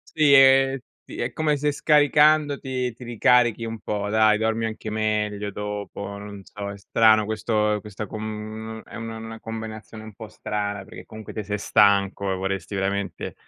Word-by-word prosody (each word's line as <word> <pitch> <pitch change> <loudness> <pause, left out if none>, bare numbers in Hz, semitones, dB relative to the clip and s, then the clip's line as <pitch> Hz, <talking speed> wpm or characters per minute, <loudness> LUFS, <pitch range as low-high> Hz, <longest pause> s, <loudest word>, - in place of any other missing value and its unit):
Sì, 150 -2 +4
e 135 0 +6 0.2
ti - - -8
è - - -2
come 150 -2 +1
se 150 +1 +1
scaricandoti, 145 -4 +2
ti 125 - -12
ricarichi 120 0 +3
un 115 0 -5
po', 105 -1 -3
dai, 110 0 +4
dormi 110 0 0
anche 110 0 -5
meglio 105 -1 -1
dopo. 100 0 -6
Non 100 0 -9
so, 100 -1 -7
è 100 - -9
strano 110 +1 +4
questo 110 -1 0
questa 105 0 -7
com 110 +1 -6
è - - -15
una 115 -1 -6
'na 115 0 -8
combinazione 110 -1 -8
un 110 -2 -11
po' 110 -2 -9
strana 105 -2 -4
perché - - -11
comunque 110 0 -10
te 110 - -3
sei 105 +1 -3
stanco, 100 -1 +3
e - - -1
vorresti 95 0 -3
veramente 95 -2 -3
110 Hz, 170 wpm, -24 LUFS, 105-115 Hz, 0.2 s, e